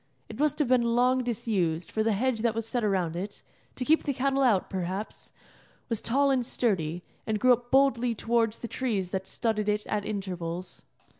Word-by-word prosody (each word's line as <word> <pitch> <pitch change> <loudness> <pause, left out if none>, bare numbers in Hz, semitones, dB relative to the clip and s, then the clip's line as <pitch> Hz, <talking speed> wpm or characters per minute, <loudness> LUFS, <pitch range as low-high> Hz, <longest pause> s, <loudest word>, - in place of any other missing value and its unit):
It - - -9
must 300 -1 +2
have 295 -3 +1
been 255 0 +4
long 255 +1 +3
disused, 190 -8 -1
for 220 - 0
the 220 0 +2
hedge 240 +3 0
that 230 0 +1
was 225 -1 -2
set 240 +1 -1
around 185 -5 0
it 200 +4 -6 0.3
to 250 - -3
keep 315 +3 +4
the 280 -3 -2
cattle 275 +1 +1
out, 225 -8 +3
perhaps 190 +3 -5 0.6
was 230 -3 -1
tall 275 +4 +2
and 260 -2 +2
sturdy, 180 -9 -1 0.2
and 215 -1 0
grew 255 +2 +6
up 240 0 -3
boldly 245 -3 +3
towards 230 0 +1
the 235 - -6
trees 210 -7 -2
that 190 0 -3
studded 215 -3 -1
it 210 0 0
at 210 -1 -1
intervals. 180 -4 -5
225 Hz, 195 wpm, -28 LUFS, 195-250 Hz, 0.6 s, grew